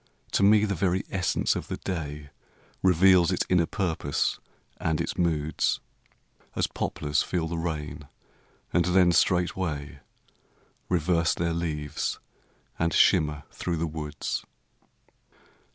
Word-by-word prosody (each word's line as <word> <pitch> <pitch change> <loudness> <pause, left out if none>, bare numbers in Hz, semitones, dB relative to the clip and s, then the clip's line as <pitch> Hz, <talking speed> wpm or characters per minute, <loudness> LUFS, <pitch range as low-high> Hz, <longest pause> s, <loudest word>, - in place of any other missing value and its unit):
To - - +1
me 105 +1 +6
the 100 - -1
very 95 0 0
essence 90 -4 +1
of - - -4
the - - -4
day 75 -5 -5 0.5
Reveals 90 -1 +5
its - - 0
inner 90 -2 +3
purpose 80 -7 -1 0.4
and 80 -2 -1
its - - -2
moods; 80 -3 0 0.8
As - - +2
poplars 75 0 -1
feel 85 -3 -1
the 85 0 -3
rain 75 -3 -4 0.7
and 85 - +4
then 90 -1 +4
straightway 85 -4 0 0.9
Reverse 85 -2 +2
their 85 -1 -1
leaves 75 -3 -2 0.6
and 85 0 +1
shimmer 75 -1 +3
through 85 -2 -3
the 80 - 0
woods. 75 -2 -4
85 Hz, 120 wpm, -27 LUFS, 75-90 Hz, 0.9 s, me